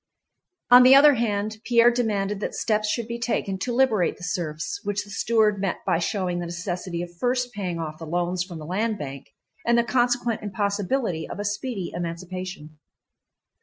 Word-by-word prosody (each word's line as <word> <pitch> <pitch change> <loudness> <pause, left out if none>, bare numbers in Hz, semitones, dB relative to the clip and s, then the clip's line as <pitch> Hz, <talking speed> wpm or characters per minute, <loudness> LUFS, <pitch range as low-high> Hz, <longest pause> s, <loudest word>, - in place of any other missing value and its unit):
On 250 +1 +10
the 255 +2 +8
other 290 +1 +8
hand, 215 -3 -1
Pierre 235 +1 +5
demanded 210 -4 -1
that - - -4
steps 215 -1 0
should 230 0 -1
be 235 0 -5
taken 225 -5 -1
to 245 - -2
liberate 235 -7 +2
the - - -13
serfs, 175 - -3
which 205 0 -2
the 205 - -13
steward 215 -2 +2
met 195 -3 -2
by 165 - +2
showing 180 -1 -1
the 175 - -4
necessity 175 0 -4
of 175 0 -10
first 250 0 0
paying 185 -5 -3
off 155 -2 -5
the 165 - -7
loans 175 +2 -1
from 180 -2 -9
the 155 - -8
Land 210 +6 -1
Bank, 140 -5 -7 0.4
and 235 0 +3
the 235 - +4
consequent 245 -1 +1
impossibility 200 -2 -1
of - - -6
a 205 - -3
speedy 205 -2 -3
emancipation. 170 -2 -6
205 Hz, 180 wpm, -24 LUFS, 175-235 Hz, 0.4 s, On